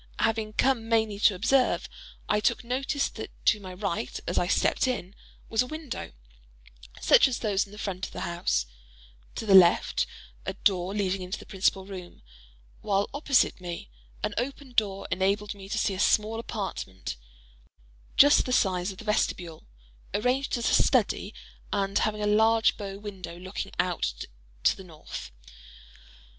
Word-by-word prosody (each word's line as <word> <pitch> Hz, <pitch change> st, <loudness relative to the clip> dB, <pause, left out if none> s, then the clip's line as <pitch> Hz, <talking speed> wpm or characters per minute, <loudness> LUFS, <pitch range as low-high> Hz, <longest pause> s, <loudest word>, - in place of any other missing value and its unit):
Having 220 Hz, -1 st, 0 dB
come 235 Hz, -2 st, +1 dB
mainly 220 Hz, -3 st, +1 dB
to 205 Hz, -2 st, +5 dB
observe, 255 Hz, +7 st, +2 dB, 0.4 s
I 210 Hz, -, +2 dB
took 210 Hz, -, +1 dB
notice 270 Hz, +4 st, -1 dB
that -, -, -7 dB, 0.2 s
to 210 Hz, -, +4 dB
my 190 Hz, -2 st, -8 dB
right 170 Hz, -, -3 dB
as -, -, 0 dB
I 175 Hz, -, 0 dB
stepped 230 Hz, -, +2 dB
in, 200 Hz, -7 st, -3 dB, 0.3 s
was 225 Hz, -, +2 dB
a 250 Hz, -, -1 dB
window, 310 Hz, -2 st, -6 dB, 0.9 s
such -, -, +6 dB
as 255 Hz, -2 st, -2 dB
those 205 Hz, -2 st, 0 dB
in 205 Hz, +1 st, -13 dB
front 195 Hz, -3 st, -3 dB
of -, -, -15 dB
the -, -, -6 dB
house; 170 Hz, -, 0 dB, 0.7 s
to -, -, -4 dB
the 200 Hz, -, +3 dB
left, 180 Hz, -3 st, +6 dB, 0.4 s
a -, -, -3 dB
door 190 Hz, 0 st, +1 dB
leading 195 Hz, -2 st, 0 dB
into 185 Hz, +3 st, -4 dB
the -, -, -12 dB
principal 190 Hz, -1 st, 0 dB
room; 185 Hz, -, -10 dB, 0.6 s
while, 200 Hz, -1 st, 0 dB
opposite 275 Hz, -8 st, +2 dB
me, 170 Hz, -, -6 dB, 0.3 s
an -, -, -1 dB
open 270 Hz, +2 st, -5 dB
door 200 Hz, -4 st, 0 dB
enabled 200 Hz, +2 st, 0 dB
me 195 Hz, -1 st, -11 dB
to 225 Hz, -, -2 dB
see 205 Hz, -, +1 dB
a 185 Hz, -, -5 dB
small 215 Hz, +2 st, +2 dB
apartment, 190 Hz, -, -5 dB, 1.0 s
just 285 Hz, -1 st, +7 dB
the -, -, -2 dB
size 185 Hz, -4 st, +2 dB
of 190 Hz, -, -11 dB
the 225 Hz, -, -10 dB
vestibule, 180 Hz, -, -1 dB, 0.5 s
arranged 250 Hz, +5 st, +1 dB
as 235 Hz, -, 0 dB
a -, -, +6 dB
study, -, -, +1 dB, 0.4 s
and 195 Hz, -1 st, +1 dB
having 210 Hz, -1 st, 0 dB
a -, -, +1 dB
large 220 Hz, +2 st, +4 dB
bow 195 Hz, -2 st, -6 dB
window 195 Hz, -4 st, -8 dB
looking 185 Hz, +2 st, -6 dB
out 180 Hz, -1 st, 0 dB, 0.5 s
to -, -, +4 dB
the 190 Hz, -, -11 dB
north. 160 Hz, -, -9 dB
205 Hz, 160 wpm, -27 LUFS, 185-225 Hz, 1.0 s, just